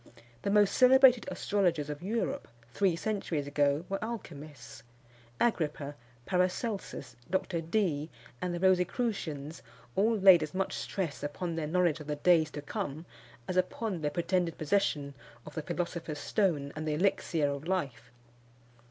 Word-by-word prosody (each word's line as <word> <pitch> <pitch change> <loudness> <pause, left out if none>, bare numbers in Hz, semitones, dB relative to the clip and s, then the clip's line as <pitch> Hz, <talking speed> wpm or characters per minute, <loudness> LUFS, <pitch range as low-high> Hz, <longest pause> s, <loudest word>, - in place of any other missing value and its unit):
The - - -1
most 205 -1 +4
celebrated 255 -1 +6
astrologers 175 -7 0
of 150 +1 -6
Europe, 230 +8 -2 0.3
three 190 -4 +2
centuries 180 -6 -2
ago, 145 +2 +1
were 195 +1 -3
alchymists. 150 - -8 0.6
Agrippa, 150 -9 0 0.3
Paracelsus, 185 - -2
Dr. 185 -2 -1
Dee, 165 -4 0 0.3
and 180 - -1
the 175 - -3
Rosicrucians, 180 - 0 0.3
all 220 +4 +3
laid 190 -4 +8
as 155 +3 -4
much 190 0 -1
stress 180 -7 -3
upon 165 +4 -3
their 160 -2 -2
knowledge 170 -1 +2
of 150 - -9
the 150 - -1
days 160 +1 +4
to 145 -1 -7
come, 145 +2 -4 0.4
as 185 - -2
upon 185 0 -1
their 150 - 0
pretended 175 +1 0
possession 150 -4 0 0.3
of - - -10
the 160 - -3
philosopher's 170 -1 -4
stone 150 -6 0
and 155 0 -4
the 150 - 0
elixir 165 -4 +1
of 140 +3 -6
life. 140 -10 -2
170 Hz, 145 wpm, -30 LUFS, 150-195 Hz, 0.6 s, laid